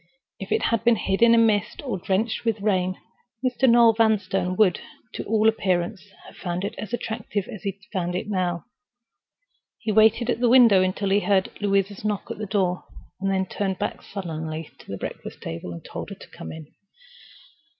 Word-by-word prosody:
If 195 - -7
it - - +2
had 230 -1 +1
been 235 0 +5
hidden 225 +4 +4
in 230 0 +6
mist 210 +5 0
or 220 -8 -2
drenched 205 +5 -1
with 225 -2 0
rain, 185 -3 0 0.5
Mr. 255 +1 +3
Noel 235 -1 +7
Vanstone 200 -5 +1
would, 190 -3 +3 0.3
to - - -4
all 220 0 +3
appearance, 185 -2 0 0.2
have - - -14
found 175 0 -3
it - - -3
as 215 - -6
attractive 220 -4 -3
as 210 - -8
he 195 -2 -3 0.2
found 180 -2 -1
it 180 - -3
now. 180 -4 -1 1.1
He 220 - -2
waited 220 +3 +4
at - - -2
the 245 -1 +3
window 235 -6 +7
until 185 +1 0
he 200 - +5
heard 200 -2 +1
Louisa's 200 0 0
knock 210 -2 -2
at - - -6
the 215 - -4
door, 185 -3 0 0.4
then 195 -1 +1
turned 190 0 -2
back 205 - -3
sullenly 160 -4 -5
to - - -16
the 100 - -4
breakfast - - -7
table 85 +2 -6
and 85 - -9
told - - -6
her - - -7
to - - -14
come 80 - -9
in. 160 -1 -9
200 Hz, 185 wpm, -24 LUFS, 185-220 Hz, 1.1 s, Noel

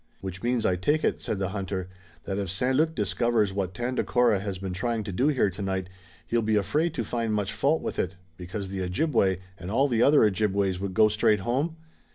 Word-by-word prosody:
"Which 95 -1 -6
means, 120 -1 0
I 90 - +2
take 150 - +1
it," - - 0
said 105 - -2
the 95 -1 -1
hunter, 95 -2 -3 0.4
"that 95 0 -3
if 100 -3 -3
St. 125 +9 +1
Luc 160 +3 +2
discovers 115 -5 +1
what 95 -2 -3
Tandakora 120 -2 +1
has 100 -1 -4
been 95 0 -5
trying 115 +4 -1
to 100 - -5
do 125 +10 +1
here 130 -9 +2
tonight 95 -1 -3 0.4
he'll 115 0 +1
be 110 -1 +1
afraid 150 - +1
to 120 - -1
find 115 0 -2
much 105 0 -1
fault 155 +3 +1
with - - -4
it, 95 - -1 0.2
because 95 +3 -6
the 95 -1 -4
Ojibway 95 - +1 0.2
and 85 - -6
all 135 +7 +3
the 120 -4 +1
other 145 +1 +6
Ojibways 100 -2 +1
would 95 -1 -4
go 110 -1 +6
straight 105 -1 +2
home?" 135 - -1
105 Hz, 210 wpm, -27 LUFS, 95-120 Hz, 0.4 s, other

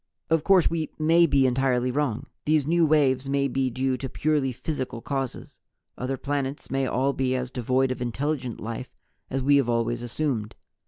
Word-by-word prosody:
"Of 165 -2 +3
course 190 -2 +5
We 160 -2 -2
may 165 +2 +4
be 140 -3 +3
entirely 125 -1 +1
wrong. 135 -5 -1 0.2
These 150 -2 +3
new 165 +1 +3
waves 135 -3 +2
may 140 0 +1
be 130 0 0
due 130 +1 -1
to 130 +1 -5
purely 145 -2 0
physical 130 -2 -4
causes. 135 0 -4 0.4
Other 130 +2 -3
planets 140 0 -3
may 135 0 0
all 135 +3 +1
be 130 -1 0
as 125 -1 -3
devoid 130 +1 +1
of 130 - -4
intelligent 130 0 -2
life 115 +3 -6 0.3
as 135 0 -2
We 140 +1 +5
have 135 -4 +1
always 120 0 0
assumed. 120 -3 -2
135 Hz, 175 wpm, -26 LUFS, 125-145 Hz, 0.4 s, course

